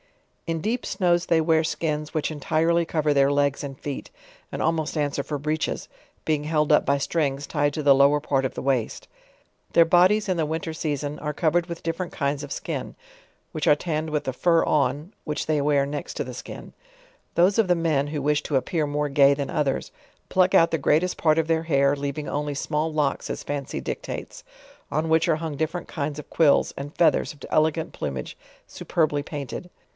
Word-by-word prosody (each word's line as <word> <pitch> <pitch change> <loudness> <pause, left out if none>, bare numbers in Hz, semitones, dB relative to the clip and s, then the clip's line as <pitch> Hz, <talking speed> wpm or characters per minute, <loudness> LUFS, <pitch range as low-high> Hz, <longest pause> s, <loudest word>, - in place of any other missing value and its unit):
In 165 -1 -1
deep 235 +6 -1
snows 175 -3 +1
they 165 - +3
wear 160 0 +3
skins, 150 -1 -2
which 155 0 -1
entirely 165 +3 +1
cover 155 -2 +1
their 140 0 +4
legs 145 0 +1
and 135 -2 -7
feet, 145 -2 -5 0.4
and - - -5
almost 160 -1 0
answer 145 -1 0
for 145 - -3
breeches: 155 +2 -2 0.4
being 155 -2 0
held 150 -1 +1
up - - +4
by 140 - +2
strings 140 -1 -1
tied 145 0 0
to 155 - -2
the 140 -1 +6
lower 140 +2 +5
part 140 -2 0
of 130 - -3
the - - -5
waist. 130 -4 -1 0.7
Their 170 - +6
bodies 185 +5 +4
in 185 - +1
the 160 - +1
winter 160 +1 -3
season, 150 -2 -3
are 150 -1 -4
covered 170 +2 +1
with 170 -1 -7
different 165 +2 -3
kinds 140 0 -2
of 145 - -8
skin, - - -4 0.6
which 155 - -2
are 150 - +7
tanned 155 -1 -2
with 150 -1 -1
the 130 - -2
fur 165 +5 +3
on, 145 - 0
which 150 -1 -3
they 155 -2 +1
wear 140 -1 +2
next 145 +1 -5
to - - -2
the - - -8
skin. - - -9 0.6
Those 185 +5 +4
of 220 - +4
the 180 - +5
men, 155 -4 +1
who 150 -1 -3
wish 150 +1 +2
to 145 - 0
appear 155 +4 -1
more 150 +1 -1
gay 140 0 +5
than 140 -1 -4
others, 140 -3 -1 0.4
pluck 185 0 +3
out 165 - +5
the 165 - +1
greatest 160 +6 +2
part 155 -1 +2
of 160 -1 +1
their 165 0 +1
hair, 140 -3 +2
leav 140 0 -4
ing 150 - -4
only 145 0 -2
small 155 +3 -1
locks 150 -3 -1
as - - -4
fancy 145 -2 -4
dictates, - - -6 0.5
on 155 +3 0
which 160 +1 +3
are 155 - +3
hung 160 -2 -4
different 160 +4 -3
kinds 145 -2 -4
of 150 - -10
quills, 155 -4 +3
and 145 +2 -7
feathers 170 - +3
of 145 - -21
elegant 160 +1 +1
plumage 65 -3 -5 0.3
su - - -10
perbly 155 -4 +1
painted. 145 +4 -6
150 Hz, 205 wpm, -24 LUFS, 145-165 Hz, 0.7 s, are